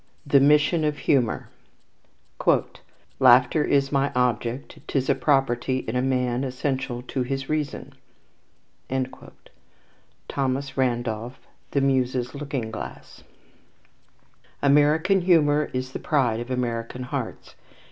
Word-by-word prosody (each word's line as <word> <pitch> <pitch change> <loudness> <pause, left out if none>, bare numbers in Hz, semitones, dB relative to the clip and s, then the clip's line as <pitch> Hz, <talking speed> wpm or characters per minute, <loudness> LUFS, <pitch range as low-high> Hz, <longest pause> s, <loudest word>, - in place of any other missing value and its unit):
The 140 -1 +5
Mission 150 +4 +4
of 150 -1 0
Humour 125 -7 +1 1.7
"Laughter 130 +3 +5
is 140 -1 +1
my 140 0 +1
object: 125 +1 -1
'tis 135 -1 0
a - - +5
property 130 -2 +1
In 125 +3 0
man, 125 -1 0
essential 130 -1 -3
to 130 +1 -3
his 135 +2 -3
reason." 155 -2 -3 2.3
THOMAS 135 0 -2
RANDOLPH, 120 -2 -1 0.3
The 140 - 0
Muses' 130 -2 0
Looking 140 -6 -4
Glass. - - -9 1.4
American 150 +7 +4
humour 150 -4 +3
is 130 0 -3
the - - -5
pride 125 -7 +1
of 120 +1 -6
American 125 -1 -3
hearts. 125 - -5
130 Hz, 105 wpm, -24 LUFS, 125-145 Hz, 2.3 s, The